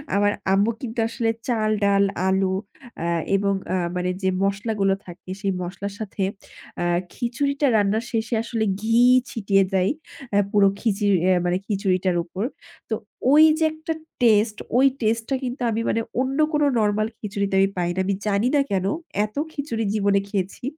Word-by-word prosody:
আমার 205 0 +3 0.2
আম্মু 200 +3 +3
কিন্তু 235 -3 -5
আসলে 230 0 -1 0.2
চাল, 220 -3 +1
ডাল, 200 0 +4 0.2
আলু 190 0 +2 0.5
আ - - -2 0.3
এবং 200 0 +1 0.2
আ - - +2 0.2
মানে 180 0 -1
যে 190 - +2
মসলাগুলো 200 0 +1
থাকে 175 +1 -12
সেই 200 -2 0
মসলার 190 +3 -5
সাথে 205 -2 -4 0.6
আ - - 0 0.3
খিচুড়িটা 280 +4 0
রান্নার 210 +3 +1
শেষে 225 0 -2
আসলে 230 -1 -2 0.2
ঘি 225 +2 +2 0.3
ছিটিয়ে 195 -3 +2
দেয় 190 0 +2 0.4
আ - - +5
পুরো 205 -2 +5
খিচুড়ি 205 -3 +1 0.3
মানে 175 +1 +1
খিচুড়িটার 190 -3 0
উপর। 185 +4 -5 0.5
তো - - -1 0.4
ওই 300 +2 +8 0.2
যে - - +2
একটা 315 +1 -4 0.3
টেস্ট, 215 -1 +4 0.2
ওই 265 - +5 0.2
টেস্ট 225 +1 +1
টা 270 - +1
কিন্তু 250 +1 -4
আমি 225 +1 -1
মানে 230 - +1 0.2
অন্য 265 +1 -1 0.2
কোনো 295 -1 +3
নরমাল 215 0 +1
খিচুড়িতে 200 -2 -2
আমি 195 0 +4
পাই 175 -1 0
না। - - -2
আমি 195 +1 0
জানি 205 +3 +2
না 285 - +5
কেন 190 -1 0 0.4
এত 215 - -12 0.2
খিচুড়ি 285 -7 -3
জীবনে 200 -2 +2
খেয়েছি 195 +1 -3
205 Hz, 165 wpm, -23 LUFS, 195-230 Hz, 0.6 s, ওই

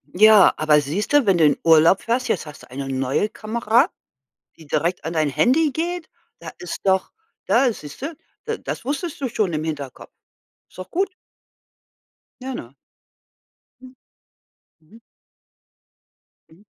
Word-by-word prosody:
Ja, 210 +1 +6
aber 150 -1 +4
siehste, 205 - +1
wenn 195 -3 +3
du 160 - +4
in 145 - +3
Urlaub 165 +3 +5
fährst, 245 +2 -1
jetzt 180 - -1
hast 150 -1 -12
du - - -15
'ne 135 0 -4
neue 135 +9 0
Kamera, 225 +2 +1 0.7
die 160 - -15
direkt 165 +4 -1
an 165 - -3
dein 155 -2 +1
Handy 280 - +2
geht. 340 +3 -3 0.3
Da - - -8
ist 180 - -6
doch 190 -1 +1 0.3
da 260 -3 +3
siehste 255 - -8 0.3
da 455 0 -3
das - - -6
wusstest 290 +3 -4
du 265 - -1
schon 205 -6 -1
im 155 0 -2
Hinterkopf. 145 -5 -6 0.6
Ist - - -21
doch 185 - -8
gut. 380 +1 -1 1.3
Ja, 265 0 -4
ne? 120 - -8 1.1
Hm. 255 0 -13 0.9
Mhm. 170 +9 -19 1.5
Mhm. 165 +5 -21
195 Hz, 145 wpm, -22 LUFS, 155-260 Hz, 1.5 s, Ja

